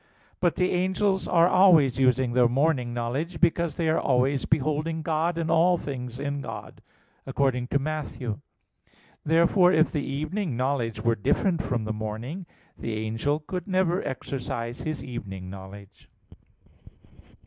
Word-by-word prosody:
But 175 Hz, -2 st, +2 dB
the 180 Hz, 0 st, +1 dB
angels 190 Hz, +2 st, +1 dB
are 170 Hz, -1 st, +5 dB
always 165 Hz, -10 st, +5 dB
using 130 Hz, -1 st, +3 dB
their 125 Hz, -1 st, +5 dB
morning 130 Hz, -1 st, +1 dB
knowledge; 130 Hz, +9 st, -3 dB
because 170 Hz, -3 st, +2 dB
they 165 Hz, -, -1 dB
are 160 Hz, -, +2 dB
always 130 Hz, +1 st, +1 dB
beholding 155 Hz, +2 st, 0 dB
God 165 Hz, +2 st, 0 dB
and 165 Hz, -1 st, -1 dB, 0.3 s
things 125 Hz, -3 st, -6 dB
in 140 Hz, +1 st, -3 dB
God, -, -, -8 dB, 0.5 s
according 125 Hz, -3 st, 0 dB
to 140 Hz, -, +1 dB
Matt. 155 Hz, +1 st, -2 dB
18:10. 115 Hz, -5 st, -5 dB, 0.8 s
Therefore, 170 Hz, +3 st, +4 dB
if 160 Hz, -2 st, +3 dB
the 150 Hz, -3 st, -1 dB
evening 155 Hz, -, -3 dB
knowledge 125 Hz, -3 st, -1 dB
were 115 Hz, -, +2 dB
different 165 Hz, -, +1 dB
from 120 Hz, -4 st, -2 dB
the 110 Hz, 0 st, -2 dB
morning, 110 Hz, -, -5 dB, 0.3 s
the 115 Hz, -, -3 dB
angel 115 Hz, +8 st, -1 dB
could 180 Hz, +3 st, -5 dB
never 185 Hz, -1 st, +1 dB
exercise 120 Hz, -2 st, -4 dB
his 155 Hz, -2 st, -4 dB
evening 95 Hz, -7 st, -7 dB
knowledge. 100 Hz, +1 st, -12 dB
140 Hz, 140 wpm, -26 LUFS, 120-165 Hz, 0.8 s, are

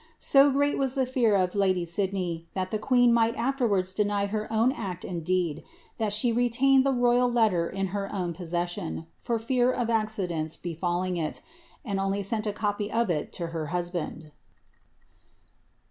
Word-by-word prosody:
So 275 Hz, +1 st, +5 dB
great 285 Hz, +1 st, +1 dB
was 270 Hz, -1 st, 0 dB
the 265 Hz, -1 st, +2 dB
fear 245 Hz, -4 st, +2 dB
of 185 Hz, -2 st, +1 dB
lady 185 Hz, -3 st, +1 dB
Sidney 175 Hz, -2 st, -2 dB
that 185 Hz, -1 st, -2 dB
the 215 Hz, -, -1 dB
queen 245 Hz, +1 st, +4 dB
might 230 Hz, 0 st, +3 dB
afterwards 230 Hz, -7 st, 0 dB
deny 205 Hz, 0 st, +1 dB
her 215 Hz, +2 st, -3 dB
own 225 Hz, +3 st, +3 dB
act 190 Hz, -, -5 dB
and 170 Hz, -3 st, -4 dB
deed, 170 Hz, -3 st, -1 dB, 0.4 s
that 215 Hz, -2 st, 0 dB
she 215 Hz, +3 st, +2 dB
retained 245 Hz, +3 st, +3 dB
the 275 Hz, -, +2 dB
royal 245 Hz, 0 st, +3 dB
letter 210 Hz, -8 st, +2 dB
in 195 Hz, 0 st, -2 dB
her 200 Hz, -1 st, -3 dB
own 180 Hz, -4 st, -2 dB
possession, 170 Hz, -, -4 dB
for 235 Hz, -, -1 dB
fear 245 Hz, +2 st, +1 dB
of 235 Hz, -2 st, -1 dB
accidents 190 Hz, -8 st, -1 dB
befalling 175 Hz, +1 st, -2 dB
it, 160 Hz, -2 st, -3 dB, 0.4 s
and 200 Hz, -4 st, -2 dB
only 195 Hz, +1 st, -1 dB
sent 215 Hz, +2 st, -1 dB
a -, -, +1 dB
copy 205 Hz, 0 st, -2 dB
of 230 Hz, -4 st, +1 dB
it 150 Hz, -3 st, -2 dB
to 170 Hz, -2 st, -4 dB
her 160 Hz, -2 st, -3 dB
husband. 175 Hz, -2 st, -4 dB
200 Hz, 170 wpm, -27 LUFS, 175-235 Hz, 0.4 s, So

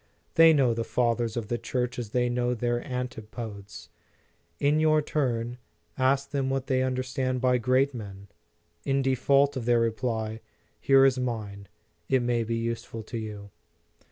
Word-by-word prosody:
They 165 Hz, 0 st, +7 dB
know 135 Hz, -6 st, +3 dB
the 115 Hz, 0 st, -2 dB
Fathers 120 Hz, -1 st, 0 dB
of 115 Hz, -3 st, -3 dB
the 120 Hz, +1 st, -2 dB
Church 125 Hz, -1 st, -2 dB
as 115 Hz, -4 st, -5 dB
they 125 Hz, +2 st, +1 dB
know 120 Hz, 0 st, 0 dB
their 120 Hz, +1 st, -1 dB
antipodes. 110 Hz, -4 st, -7 dB, 0.7 s
In 145 Hz, +2 st, +3 dB
your 155 Hz, 0 st, +4 dB
turn, 125 Hz, -5 st, -2 dB, 0.4 s
ask 135 Hz, +1 st, +1 dB
them 135 Hz, -2 st, -1 dB
what 135 Hz, -1 st, -1 dB
they 130 Hz, -1 st, +1 dB
understand 130 Hz, 0 st, -1 dB
by 125 Hz, 0 st, +2 dB
great 130 Hz, +4 st, +2 dB
men. 100 Hz, -4 st, -8 dB, 0.6 s
In 135 Hz, 0 st, +1 dB
default 140 Hz, +2 st, +3 dB
of 125 Hz, -3 st, -4 dB
their 120 Hz, -1 st, +3 dB
reply, 110 Hz, -1 st, -1 dB, 0.4 s
here 135 Hz, 0 st, +5 dB
is 130 Hz, -1 st, +3 dB
mine; 105 Hz, -5 st, -4 dB, 0.4 s
it 130 Hz, -2 st, +3 dB
may 120 Hz, -1 st, +1 dB
be 115 Hz, +1 st, -2 dB
useful 115 Hz, -1 st, -4 dB
to 115 Hz, -, -6 dB
you. 105 Hz, -2 st, -7 dB
125 Hz, 155 wpm, -27 LUFS, 115-130 Hz, 0.7 s, They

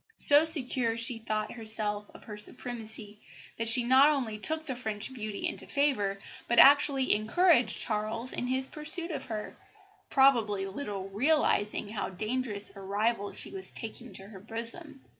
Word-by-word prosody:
So 290 Hz, +2 st, +7 dB
secure 255 Hz, -7 st, +2 dB
she 230 Hz, 0 st, 0 dB
thought 215 Hz, -1 st, -3 dB
herself 215 Hz, -2 st, -3 dB
of -, -, -13 dB
her 210 Hz, -, -8 dB
supremacy 215 Hz, -1 st, -5 dB, 0.4 s
that 230 Hz, -, -1 dB
she 240 Hz, +2 st, +7 dB
not 260 Hz, +4 st, +6 dB
only 245 Hz, -8 st, -2 dB
took 315 Hz, +7 st, -1 dB
the 265 Hz, -5 st, -3 dB
French 220 Hz, 0 st, -5 dB
beauty 215 Hz, -4 st, -4 dB
into -, -, -7 dB
favour, 255 Hz, -9 st, 0 dB, 0.3 s
but 235 Hz, -, 0 dB
actually 275 Hz, -1 st, +6 dB
encouraged 250 Hz, -, +3 dB
Charles 220 Hz, +3 st, -2 dB
in 245 Hz, -, -3 dB
his 260 Hz, +1 st, -1 dB
pursuit 315 Hz, +5 st, -1 dB
of 300 Hz, -, -5 dB
her, 215 Hz, -2 st, -6 dB, 0.5 s
probably 230 Hz, -8 st, +3 dB
little 195 Hz, -2 st, -6 dB
realising 210 Hz, -3 st, +1 dB
how 215 Hz, -1 st, -4 dB
dangerous 215 Hz, +1 st, -3 dB
a -, -, -10 dB
rival 205 Hz, +2 st, -1 dB
she -, -, -3 dB
was 385 Hz, -1 st, -6 dB
taking 230 Hz, +1 st, -8 dB
to 190 Hz, -, -5 dB
her 200 Hz, -3 st, -11 dB
bosom. 235 Hz, -, -7 dB
230 Hz, 160 wpm, -29 LUFS, 210-270 Hz, 0.5 s, So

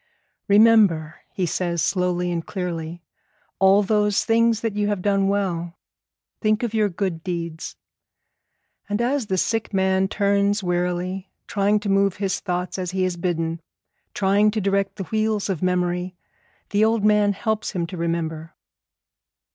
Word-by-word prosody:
'Remember,' 200 Hz, -7 st, +4 dB
he 185 Hz, -, -1 dB
says 175 Hz, 0 st, -1 dB
slowly 180 Hz, 0 st, 0 dB
and 170 Hz, -1 st, -3 dB
clearly, 170 Hz, -2 st, -5 dB, 0.6 s
'all 195 Hz, +2 st, +5 dB
those 210 Hz, 0 st, +1 dB
things 230 Hz, 0 st, +3 dB
that 225 Hz, -3 st, -2 dB
you 210 Hz, 0 st, 0 dB
have 205 Hz, -3 st, -2 dB
done 195 Hz, -1 st, +2 dB
well. 180 Hz, -4 st, -2 dB, 0.6 s
Think 215 Hz, +1 st, +1 dB
of 235 Hz, -2 st, -2 dB
your 215 Hz, -2 st, +2 dB
good 175 Hz, -3 st, -3 dB
deeds.' 170 Hz, -3 st, -5 dB, 1.1 s
And 205 Hz, +1 st, -1 dB
as 250 Hz, 0 st, 0 dB
the 190 Hz, -, -1 dB
sick 220 Hz, +2 st, -1 dB
man 190 Hz, 0 st, +2 dB
turns 200 Hz, 0 st, +1 dB
wearily, 180 Hz, +1 st, -2 dB, 0.2 s
trying 205 Hz, +1 st, +1 dB
to 205 Hz, -, -3 dB
move 195 Hz, -1 st, +2 dB
his 195 Hz, -2 st, -2 dB
thoughts 180 Hz, 0 st, -3 dB
as 180 Hz, -1 st, -3 dB
he 185 Hz, 0 st, 0 dB
is 180 Hz, -1 st, -2 dB
bidden, 165 Hz, -2 st, -2 dB, 0.5 s
trying 205 Hz, +2 st, +3 dB
to 215 Hz, +1 st, -1 dB
direct 195 Hz, 0 st, 0 dB
the 195 Hz, -, -5 dB
wheels 215 Hz, +1 st, -1 dB
of 180 Hz, -, -4 dB
memory, 180 Hz, 0 st, -1 dB, 0.6 s
the 210 Hz, +1 st, +3 dB
old 220 Hz, -1 st, +2 dB
man 210 Hz, -1 st, +4 dB
helps 220 Hz, +2 st, -2 dB
him 175 Hz, -3 st, -1 dB
to 170 Hz, -, -8 dB
remember. 165 Hz, -1 st, -3 dB
195 Hz, 150 wpm, -23 LUFS, 175-210 Hz, 1.1 s, all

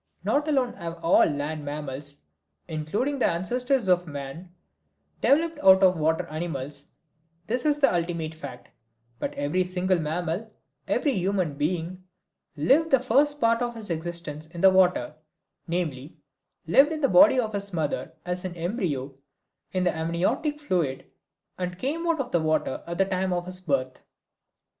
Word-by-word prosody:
Not 295 Hz, +2 st, +1 dB
alone 265 Hz, -5 st, +1 dB
have 170 Hz, 0 st, -6 dB
all 165 Hz, -, +5 dB
land 150 Hz, +1 st, -3 dB
mammals, 145 Hz, -1 st, -5 dB, 0.4 s
including 200 Hz, -, -2 dB
the -, -, +3 dB
ancestors 245 Hz, +7 st, 0 dB
of 180 Hz, -1 st, +3 dB
man, 145 Hz, +5 st, -7 dB, 0.7 s
developed 320 Hz, +2 st, +2 dB
out 190 Hz, -6 st, +6 dB
of 185 Hz, -1 st, +6 dB
water 160 Hz, 0 st, +1 dB
animals 150 Hz, -3 st, -4 dB, 0.6 s
this 245 Hz, +6 st, -2 dB
is 295 Hz, -1 st, +3 dB
the 280 Hz, -7 st, +4 dB
ultimate 170 Hz, -2 st, -2 dB
fact 140 Hz, -6 st, -10 dB, 0.5 s
but -, -, -2 dB
every 145 Hz, +6 st, 0 dB
single 180 Hz, 0 st, 0 dB
mammal, 170 Hz, +7 st, -3 dB, 0.4 s
every 285 Hz, -, +1 dB
human 185 Hz, -, 0 dB
being, 175 Hz, +4 st, -2 dB, 0.5 s
lived 280 Hz, -, +3 dB
the 270 Hz, -, +5 dB
first 280 Hz, +4 st, +2 dB
part 230 Hz, -1 st, +3 dB
of 240 Hz, -1 st, -2 dB
his 215 Hz, -5 st, -6 dB
existence 160 Hz, -2 st, -4 dB
in 170 Hz, +1 st, -8 dB
the 190 Hz, -, +7 dB
water 180 Hz, -8 st, +3 dB, 0.5 s
namely, 160 Hz, -4 st, -3 dB, 0.5 s
lived 275 Hz, -, +5 dB
in 310 Hz, -1 st, -3 dB
the 275 Hz, -, +4 dB
body 270 Hz, -1 st, +6 dB
of 220 Hz, -3 st, -1 dB
his 200 Hz, 0 st, -2 dB
mother 160 Hz, -5 st, -2 dB
as 180 Hz, 0 st, -2 dB
an 185 Hz, -2 st, -5 dB
embryo 165 Hz, -, -2 dB, 0.6 s
in 185 Hz, -1 st, 0 dB
the 180 Hz, -, +1 dB
amniotic 170 Hz, -, -1 dB
fluid 170 Hz, -, -1 dB, 0.5 s
and 180 Hz, -1 st, -3 dB
came 315 Hz, -, -2 dB
out 330 Hz, -2 st, +1 dB
of 255 Hz, -2 st, -3 dB
the 170 Hz, -, +2 dB
water 155 Hz, -3 st, 0 dB
at 170 Hz, 0 st, -4 dB
the 195 Hz, -, +3 dB
time 190 Hz, 0 st, -1 dB
of 175 Hz, -1 st, -1 dB
his 185 Hz, 0 st, -6 dB
birth. 130 Hz, -6 st, -1 dB
180 Hz, 155 wpm, -26 LUFS, 155-230 Hz, 0.7 s, the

